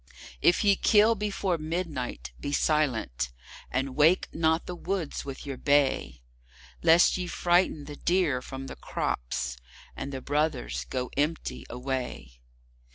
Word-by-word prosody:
If 175 - +4
ye 200 -1 +5
kill 215 +3 +5
before 200 -4 -1
midnight, 150 - -3
be 145 - -4
silent, 130 - +1 0.4
and 130 0 -2
wake 160 +5 +4
not 160 +1 +2
the 180 - -5
woods 180 -3 -3
with 135 0 -7
your 140 -2 -5
bay, 140 - +1 0.6
Lest 170 +3 +6
ye 180 -1 -3
frighten 175 -4 +2
the 145 0 -8
deer 175 -8 +1
from 135 +1 -7
the - - -7
crops, - - -3 0.4
and 140 - -5
the 135 - -4
brothers 130 - -1
go 125 - -3
empty 150 +3 -2
away. 125 - -4
145 Hz, 135 wpm, -28 LUFS, 125-175 Hz, 0.6 s, Lest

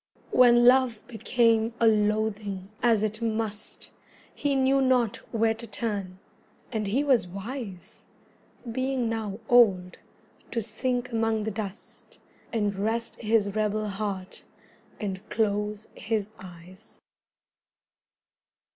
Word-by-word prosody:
When 240 -1 +6
love 250 -3 +4
became 230 -1 +1
a 230 - +3
loathing, 210 -2 +1
as 225 -3 +3
it 215 +1 -2
must, 220 -2 -3 0.4
He 285 -1 0
knew 270 +1 +3
not 250 -4 +2
where 225 0 +2
to 230 +1 -9
turn; 200 -4 -4 0.5
and 215 -4 -2
he 250 +9 +1
was 255 -10 +3
wise, 195 0 -8 0.6
Being 260 0 -1
now 220 -2 -3
old, 195 -7 +4 0.5
to 235 - -2
sink 245 +3 -2
among 225 -1 0
the 220 - -2
dust, 200 -2 -8 0.3
And 205 -3 0
rest 225 +4 -2
his 215 -2 +1
rebel 215 0 0
heart, 195 -2 -5 0.6
and 190 -3 -4
close 210 -1 -1
his 215 -3 -2
eyes. 180 0 -13
220 Hz, 110 wpm, -27 LUFS, 205-235 Hz, 0.6 s, When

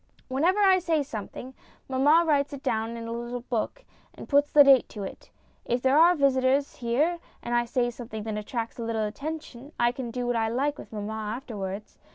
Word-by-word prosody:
Whenever 340 +10 +2
I 380 -2 +6
say 325 -4 +1
something, 250 +1 -7 0.3
mamma 285 +6 +4
writes 285 -2 +1
it 275 - -8
down 225 +1 -1
in 230 0 -6
a - - -5
little 240 +1 -4
book, 250 - -3 0.3
and - - -10
puts 285 0 +3
the 290 - +8
date 275 -2 +5
to 205 - -7
it. 190 - -9 0.3
If 240 +1 -1
there 265 +1 +4
are 345 +2 +7
visitors 275 -1 +2
here 285 +9 0 0.2
and 240 - -3
I 240 0 +2
say 240 0 0
something 230 -3 -7
that 220 -1 -4
attracts 225 +3 -4
a - - -3
little 225 -1 -1
attention, 285 +3 -7
I 240 0 +4
can 250 -1 -6
do 245 +1 -3
what 245 0 0
I 225 -1 +1
like 280 +5 -1
with - - -11
mamma 210 0 -4
afterwards. 215 -3 -5
245 Hz, 205 wpm, -27 LUFS, 230-285 Hz, 0.3 s, the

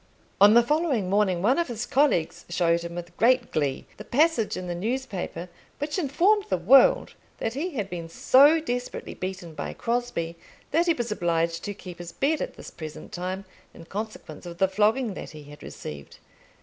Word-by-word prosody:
On 205 +2 +8
the 235 - +7
following 270 - 0
morning 195 -4 +2
one 255 +9 +3
of 340 - 0
his 235 -2 -4
colleagues 175 - +1
showed 170 -1 +2
him 170 0 -7
with 175 0 -7
great 245 +1 +3
glee 140 -3 -1
the 210 - -8
passage 285 -2 +2
in 185 - -5
the 175 - -3
newspaper 195 -4 -3 0.3
which 295 +5 -2
informed 365 +8 +2
the 185 - +1
world 235 +11 +5 0.2
that 225 - -2
he 305 +5 -3
had 210 -5 -2
been 170 -3 -6
so 285 - +5
desperately 245 -5 -4
beaten 185 -3 -6
by - - -5
Crosbie 230 -9 -2 0.3
that 335 +4 +2
he 335 - +5
was 240 -4 -3
obliged 170 -3 0
to 205 -1 -4
keep 180 -3 -10
his 175 -1 -8
bed 300 +3 0
at - - -4
this - - -10
present 155 -2 -9
time 185 +2 -4 0.3
in 165 - -12
consequence 195 -5 -7
of 170 0 -8
the 190 - +3
flogging 215 +4 +1
that - - -7
he 155 -2 -11
had 145 +1 -13
received. 70 -1 -9
205 Hz, 190 wpm, -26 LUFS, 170-260 Hz, 0.3 s, On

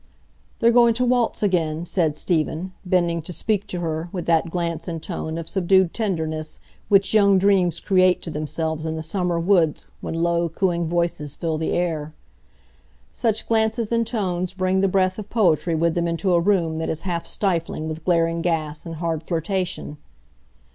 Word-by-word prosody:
"They're 235 - +5
going 235 -1 +5
to 250 +2 +1
waltz 245 -3 +1
again," 170 -4 0
said 160 -4 0
Stephen, 165 +2 -1
bending 175 -3 +1
to 165 - -7
speak 205 +3 -1
to 180 - -4
her, 160 0 -3
with 180 -3 -4
that 165 0 +2
glance 170 -1 -3
and 165 -2 -3
tone 160 -1 -5
of 165 -1 -6
subdued 190 -1 +2
tenderness 160 -7 -2 0.3
which 195 0 +4
young 200 -2 +5
dreams 190 -3 +3
create 185 -2 +3
to 165 - -5
themselves 160 +1 -2
in 160 - -2
the 160 - -4
summer 175 +1 -1
woods 170 -3 +2
when - - -5
low, 170 0 +1
cooing 170 0 0
voices 170 -4 -1
fill 160 -2 -2
the 160 - -1
air. 160 -3 -2 1.0
Such 225 -3 -1
glances 225 0 +1
and 230 -1 +1
tones 185 -5 -2
bring 185 0 +1
the 195 - +3
breath 185 +1 +1
of 210 - -8
poetry 175 -6 +2
with 165 +1 +1
them 170 0 0
into 170 +3 0
a 170 - +5
room 170 -4 +1
that 160 - -2
is 160 0 -2
half 175 -2 -3
stifling 170 -5 -1
with 155 0 -6
glaring 165 -1 +1
gas 160 -2 -2
and 165 - -5
hard 165 -1 -2
flirtation. 175 -1 -3
170 Hz, 175 wpm, -23 LUFS, 160-190 Hz, 1.0 s, They're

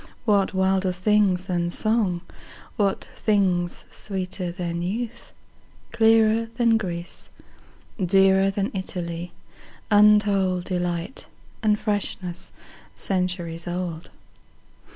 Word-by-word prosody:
What 205 -3 +3
wilder 190 0 +2
things 185 0 +2
than 175 -2 -1
song, 205 -3 +1 0.5
what 200 -3 0
thingsSweeter 185 -1 -1
than 170 -2 -3
youth, 225 +6 -4 0.6
clearer 225 0 +4
than 230 -2 +4
Greece, 175 -4 -5 0.7
Dearer 195 +1 +5
than 195 +1 -1
Italy, 175 -2 -4 0.6
untoldDelight, 190 -3 +2 0.3
and 210 -2 +2
freshness 190 -3 -2 0.4
centuries 180 -3 -2
old? 175 -2 -4
190 Hz, 80 wpm, -24 LUFS, 175-210 Hz, 0.7 s, Dearer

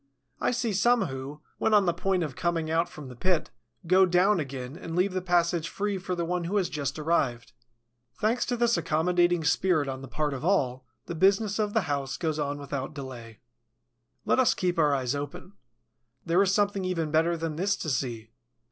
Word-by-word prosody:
I - - +1
see 240 -3 -1
some 235 +3 +3
who, 135 +1 -6 0.2
when 220 - +3
on 205 -2 +5
the 175 - +2
point 185 0 0
of 145 -5 -5
coming 165 -1 -1
out 165 +1 +1
from 150 -3 -10
the 125 - -10
pit, 175 +5 0 0.3
go 185 +2 +5
down 180 +2 +3
again 135 -2 -5
and 165 -1 -7
leave 185 +2 +2
the 185 - -1
passage 170 -2 +1
free 205 -1 -2
for 180 0 -3
the 170 -1 -2
one 175 0 -2
who 195 +5 0
has 190 -3 +1
just 140 -1 -3
arrived. 135 -8 0 0.6
Thanks 230 +3 +1
to 245 - -1
this 235 0 +2
accommodating 175 +1 +2
spirit 160 -1 +2
on 130 -1 -4
the 135 - -8
part 150 +2 -2
of 135 - -6
all, 130 -9 +1 0.2
the - - -5
business 195 +5 +2
of 210 -1 0
the 220 - +4
house 140 -5 -2
goes 155 -2 -2
on 145 -1 -2
without 140 0 -5
delay. 120 -5 -9 0.8
Let - - +2
us 255 - +4
keep 180 -2 -1
our 150 -3 +4
eyes 130 -1 -1
open. 145 +7 -6 0.7
There 170 +2 +3
is 195 -2 +3
something 200 -1 +1
even 165 -4 -1
better 165 +2 +2
than 165 -1 -3
this 195 +4 +1
to 155 - -4
see. 115 -4 -3
170 Hz, 200 wpm, -27 LUFS, 145-190 Hz, 0.8 s, on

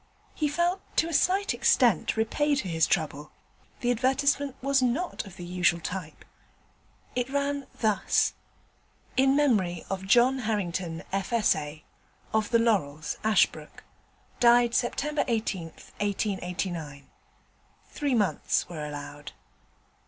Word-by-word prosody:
He 305 - 0
felt 345 +5 0 0.2
to 330 - +3
a - - -5
slight 385 +6 +2
extent 230 - +3
repaid 290 +6 +1
for - - -7
his 165 -2 +2
trouble; 150 -3 -1 0.5
the 245 - +2
advertisement 270 +3 +1
was 275 0 +2
not 255 - -1
of 190 - -12
the 180 - -8
usual 175 -1 +1
type. 170 -2 -6 0.9
It 250 +1 -1
ran 280 0 -1
thus: 215 -4 +2 0.8
'In 270 +1 +4
memory 205 - +1
of 190 0 -4
John 245 +5 +4
Harrington, 185 -7 -2
F.S.A., 190 -8 0 0.5
of 220 -1 +1
The 235 - +4
Laurels, 175 -11 0
Ashbrooke. 215 -2 +1 0.6
Died 240 0 +5
Sept. 240 +2 0
18th, 225 - -2
1889. 180 -7 -3 0.8
Three 285 -3 -1
months 205 -4 +1
were 160 -4 -6
allowed.' 145 0 -7
220 Hz, 115 wpm, -27 LUFS, 175-265 Hz, 0.9 s, Died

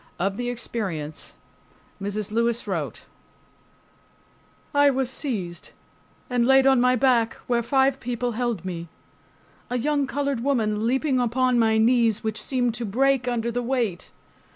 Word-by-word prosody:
Of 195 +2 -1
the 245 +2 -3
experience 190 -11 -5 0.7
Mrs. 205 +1 -3
Lewis 235 +1 0
wrote:— - - -4 1.7
I 285 0 +5
was 265 -2 0
seized 195 - -4 0.5
and 245 -1 +1
laid 265 +2 +5
on 265 -2 +5
my 250 0 +4
back, 240 -3 +2
where 240 -1 +1
five 265 +2 +2
people 245 0 -2
held 235 -5 -2
me, 170 -2 -5 0.8
a 250 - -1
young 285 +2 0
colored 280 -2 -1
woman 225 -4 0
leaping 265 +1 +1
upon 250 +1 +2
my 220 -1 +3
knees, 230 -1 +3
which 220 0 -3
seemed 245 -3 0
to 240 - -4
break 260 +4 +1
under 235 -1 -1
the 245 +1 -2
weight. 235 -7 -2
240 Hz, 140 wpm, -24 LUFS, 220-260 Hz, 1.7 s, I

